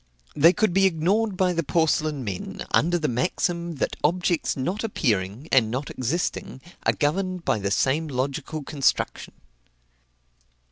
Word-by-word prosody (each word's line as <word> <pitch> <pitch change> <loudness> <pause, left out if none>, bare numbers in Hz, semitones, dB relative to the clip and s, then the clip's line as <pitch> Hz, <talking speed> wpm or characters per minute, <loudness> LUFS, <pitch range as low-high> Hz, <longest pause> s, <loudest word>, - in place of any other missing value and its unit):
They 160 +4 +7
could 210 -1 +1
be 195 +1 +5
ignored 190 +5 0
by 185 -1 +2
the 165 - 0
porcelain 155 -2 +1
men, 100 -5 -5
under 175 +3 +3
the 155 -3 -1
maxim, 170 +6 -1
that 135 - -2
objects 175 0 +1
not 180 - -2
appearing, 115 - -1
and 120 -5 +4
not 130 +5 -3
existing, 130 +1 -2 0.3
are - - +5
governed 180 +4 -1
by 110 - +1
the 100 0 -1
same 135 +9 +1
logical 140 +3 -3
construction. 140 -1 -1
155 Hz, 140 wpm, -25 LUFS, 130-175 Hz, 0.3 s, They